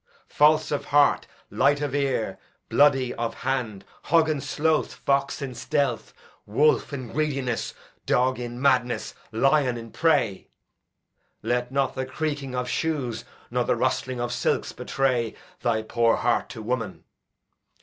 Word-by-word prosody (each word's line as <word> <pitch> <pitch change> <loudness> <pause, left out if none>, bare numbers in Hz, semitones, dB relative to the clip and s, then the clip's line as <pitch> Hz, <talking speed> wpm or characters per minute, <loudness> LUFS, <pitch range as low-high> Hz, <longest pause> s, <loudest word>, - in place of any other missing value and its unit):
False 155 +1 +4
of 145 - -1
heart, 145 0 +3 0.2
light 145 0 +3
of 145 -2 -2
ear, 135 -8 -1 0.3
bloody 135 -4 +4
of 115 -1 -3
hand; 125 -7 -2 0.2
hog 160 -1 +4
in 150 -3 -1
sloth, 155 +4 0
fox 140 +1 0
in 130 -2 -4
stealth, 140 +4 -1 0.4
wolf 145 +11 +2
in 130 -4 -5
greediness, 140 -6 -1 0.3
dog 130 0 +2
in 120 0 -5
madness, 125 -3 +1 0.2
lion 130 +2 +2
in 115 -1 -9
prey. 135 - +1 1.0
Let 120 +2 -1
not 135 -1 +1
the 130 -1 -3
creaking 145 -2 -3
of 125 0 -2
shoes 125 -4 -2 0.3
nor 125 0 +1
the - - +1
rustling 130 +1 -1
of 120 0 -2
silks - - 0
betray 125 -4 -1 0.3
thy 110 -2 +1
poor 115 +1 +2
heart 120 0 0
to 110 -3 -8
woman. 120 0 -3
130 Hz, 140 wpm, -25 LUFS, 120-145 Hz, 1.0 s, False